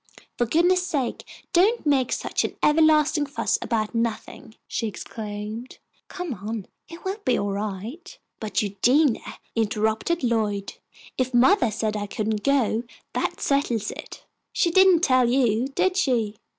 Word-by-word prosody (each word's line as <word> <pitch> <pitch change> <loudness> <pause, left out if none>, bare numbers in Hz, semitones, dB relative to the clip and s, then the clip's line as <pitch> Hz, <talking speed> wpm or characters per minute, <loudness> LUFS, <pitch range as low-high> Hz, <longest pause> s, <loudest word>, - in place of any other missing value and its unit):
"For 240 - 0
goodness' 355 +7 +3
sake 275 -8 -2 0.3
don't 400 +6 +3
make 270 -4 +2
such - - -1
an - - -3
everlasting 305 -1 +4
fuss 280 - -1
about 220 -1 -1
nothing," 230 -1 -3
she 230 - -2
exclaimed. 210 +3 -7 0.3
"Come 360 -6 -5
on; 210 0 -5 0.2
it 335 +2 -11
will 385 +3 -2
be 250 - +2
all 200 0 -1
right." 215 - -5 0.2
"But 215 0 -1
Eugenia," 240 +7 +1 0.2
interrupted 220 +8 0
Lloyd, 215 -4 0 0.5
"if 255 -1 0
mothah 250 - +4
said 215 0 -2
I 205 -1 -3
couldn't 215 0 -2
go 250 -4 +1 0.3
that - - -2
settles 245 -7 0
it." - - -10 0.3
"She 340 - +1
didn't 375 -2 +6
tell 255 -6 +4
you, 245 -1 +2
did 365 +7 0
she?" 235 - +1
240 Hz, 140 wpm, -24 LUFS, 215-310 Hz, 0.5 s, didn't